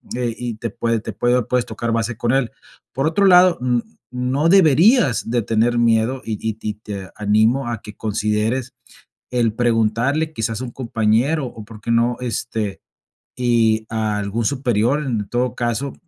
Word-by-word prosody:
eh, 120 -2 -1
y 120 -3 -4
te 115 +1 -4
puede 115 +1 -1
te - - -5
puede, 120 +1 +1
o 120 - -2
puedes 125 -1 +1
tocar 115 +1 -4
base 115 +1 -1
con 120 +2 -1
él. 135 -3 +1 0.4
Por 135 +4 0
otro 180 +5 +2
lado, 180 -1 +6
n 125 -1 +1 0.3
no 130 +5 0
deberías 165 - +4
de 120 0 +1
tener 115 +3 +1
miedo, 115 +2 +2
y 115 - -4
y 110 -1 -3
y 105 -1 -3
te 100 -3 -8
animo 110 +5 +2
a 115 -3 -4
que 105 - -11
consideres 110 +4 -1 0.6
el 115 -3 +1
preguntarle 120 +6 +1
quizás 115 -3 -2
a - - -3
un 120 - -7
compañero 120 +5 0
o, 110 - -10
¿por 110 -1 -12
qué 115 - -3
no?, 120 +1 +2
este, 115 -4 -3 0.6
y 115 -3 +2
algún 110 0 -2
superior 130 +2 +1
en 110 -7 -2
todo 125 0 -1
caso, 120 +3 -2
115 Hz, 170 wpm, -20 LUFS, 110-125 Hz, 0.6 s, lado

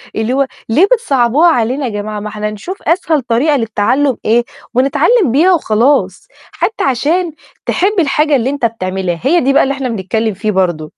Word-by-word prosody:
اللي 220 +3 -1
هو 275 0 +1 0.2
ليه 305 - +4
بتصعبوها 285 - +2
علينا 255 0 0
يا - - -2
جماعة؟ 210 0 -5
ما 210 +1 -6
إحنا 210 0 -4
نشوف 360 - -8
أسهل 325 -3 +1
طريقة 250 +6 +1
للتعلم 230 +4 0
إيه 235 +2 +2 0.3
ونتعلم 280 - +2
بيها 345 +8 +4
وخلاص، 265 -2 +1 0.2
حتى 445 - -2
عشان 310 +6 0 0.3
تحب 395 +4 +1
الحاجة 300 -1 +2
اللي 255 +1 0
أنت 280 -4 -2
بتعملها 185 -5 -3
هي 335 +6 +3
دي 275 +1 +1
بقى - - +4
اللي 275 - 0
إحنا 270 -2 -4
بنتكلم 220 +1 -2
فيه 210 +3 -2
برضو. 180 -5 0
255 Hz, 175 wpm, -14 LUFS, 215-300 Hz, 0.3 s, ليه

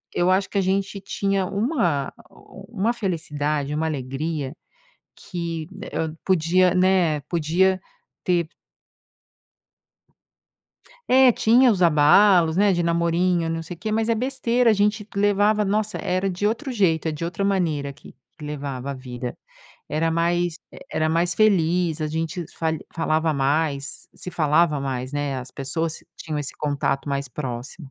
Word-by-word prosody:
eu 175 +1 +3
acho 190 +1 +1
que - - -3
a - - +3
gente 195 +1 -1
tinha 195 0 -1
uma 195 - 0
a - - -22 0.2
o 195 - -14
om 210 - -8
uma 230 +4 +2
felicidade, 150 -8 -2
uma 160 +1 -1
alegria, 140 0 -3 0.6
que 170 -3 -5
né, 200 +1 -9
hã, 160 - 0
eh, - - -12
podia, 185 0 +3
né, 180 -4 +3
podia 180 +3 +2 0.4
ter 175 -3 +1 2.6
É, 260 0 +7
tinha 240 +2 +4
os 185 -3 +1
abalos, 165 +2 +5
né, 200 -1 +4
de 175 - 0
namorinho 170 +1 +1
e 165 - -2
não 165 0 -2
sei 170 +2 -8
quê, 215 +6 -4
mas 225 +1 0
é 230 - +3
besteira, 245 -1 +1
a - - +4
gente 210 +1 0
levava 205 +1 +3
nossa 210 +1 -1
era 185 +2 -1
de 195 +2 0
outro 260 +5 -2
jeito, 170 -8 +1
eh, 160 - 0
de 150 +2 -5
outra 180 +4 -2
maneira 165 -8 0
aqui 140 +1 -13 0.2
que - - -11
levava 140 -3 -5
a - - -2
vida, 125 -1 -6 0.5
era 160 +2 0
mais 170 0 0
e - - -12
era 155 0 +1
mais 170 +2 +1
feliz, 175 -5 +2
a - - 0
gente 160 +3 -3
falha 160 -1 -1 0.2
falava 160 0 +1
mais 140 0 -1
se 180 - -7
falava 155 -1 +2
mais, 130 -2 -3
né, 145 -2 -2
as 125 0 -8
pessoas 155 +4 -3 0.2
tinham 155 -2 -4
esse 145 -2 -4
contato 145 -1 -1
mais 140 -1 -2
próximo. 130 +3 -6
170 Hz, 160 wpm, -23 LUFS, 150-195 Hz, 2.6 s, É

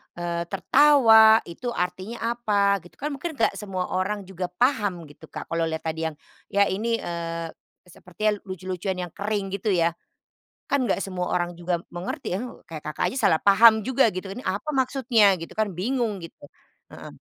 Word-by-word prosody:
eee, 170 0 -3
tertawa, 220 - +6
itu 205 +9 -7
artinya 185 +6 -3 0.2
apa? 200 -4 +1
Gitu. - - -16
Kan 295 - -1
mungkin 330 +3 -5
nggak 230 - +2
semua 190 -3 -4
orang 200 +2 -1
juga 185 -1 -4
paham, 205 -3 0
gitu 150 - -14
Kak. - - -8
Kalau 165 0 0
lihat 160 0 -4
tadi 160 0 -3
yang 155 - -7 0.4
ya 200 0 +5
ini, 230 +4 -1
eee, 165 -1 -4 0.4
sepertinya 180 +4 -3 0.2
lucu-lucuan 185 0 -4
yang 175 - -7
kering, 205 -1 -3
gitu 200 +1 -1
ya? 170 -1 +2 0.8
Kan 280 -2 +2
nggak 195 - +1
semua 180 -2 -3
orang 175 0 0
juga 175 0 -2
mengerti 175 0 -4
ya, - - -1
he - - -4 0.2
kayak 155 -2 -8
Kakak 155 - -3
aja 265 - -5
salah 160 - +3
paham 220 +3 +8
juga, 260 -3 +4
gitu. 185 +1 -6
"Ini 250 - -8
apa 200 +11 -3
maksudnya?" 250 -6 +3
Gitu 165 - -8
kan, 215 -1 +1
bingung 215 +2 -2
gitu, 165 - -12 0.5
heeh. - - -10
195 Hz, 175 wpm, -25 LUFS, 175-220 Hz, 0.8 s, paham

